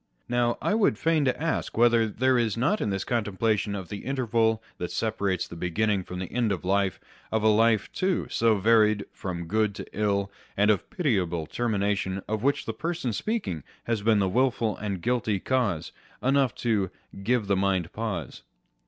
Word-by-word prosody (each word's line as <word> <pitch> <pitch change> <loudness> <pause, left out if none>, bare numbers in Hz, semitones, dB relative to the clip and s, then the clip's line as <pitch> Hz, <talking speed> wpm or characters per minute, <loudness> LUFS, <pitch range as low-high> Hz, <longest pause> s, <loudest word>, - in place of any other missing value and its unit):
Now, 120 -1 +1
I - - +2
would 215 -2 +3
fain 160 -3 +2
ask 160 +2 -1
whether 115 -1 +5
there 130 +4 +2
is 115 -2 0
not 165 - +1
in - - 0
this 95 -1 -1
contemplation 105 -2 0
of 95 -4 -6
the 105 - -5
interval 115 -4 +1 0.2
that 90 - -3
separates 100 -5 -1
the - - -9
beginning 95 +4 0
from 90 - -7
the 90 -1 -5
end 120 -3 +1
of 95 -2 -3
life, 95 0 +1 0.3
of 110 -1 0
a - - +5
life, 110 0 +3
too, 185 -1 0
so 115 -1 +2
varied 105 0 +4
from 85 -3 -5
good 105 +2 +1
to - - -6
ill, 100 -2 0 0.3
and 105 +1 +5
of 105 - +2
the - - -24
pitiable 95 - 0
termination 100 -2 -1
of 110 -1 -2
which 140 +3 +1
the 115 - -3
person 160 -1 -2
speaking 105 - -2 0.2
has 115 -3 -1
been 110 +1 +3
the 100 -2 +2
wilful 115 -1 +1
and 100 -4 -4
guilty 115 -4 +1
cause, 100 -11 0 0.3
enough 135 -2 +2
to 105 -6 0 0.3
H 100 - -9
give 120 +1 +1
the 100 0 +2
mind 95 -3 0
pause 100 - -4
110 Hz, 185 wpm, -27 LUFS, 100-120 Hz, 0.3 s, whether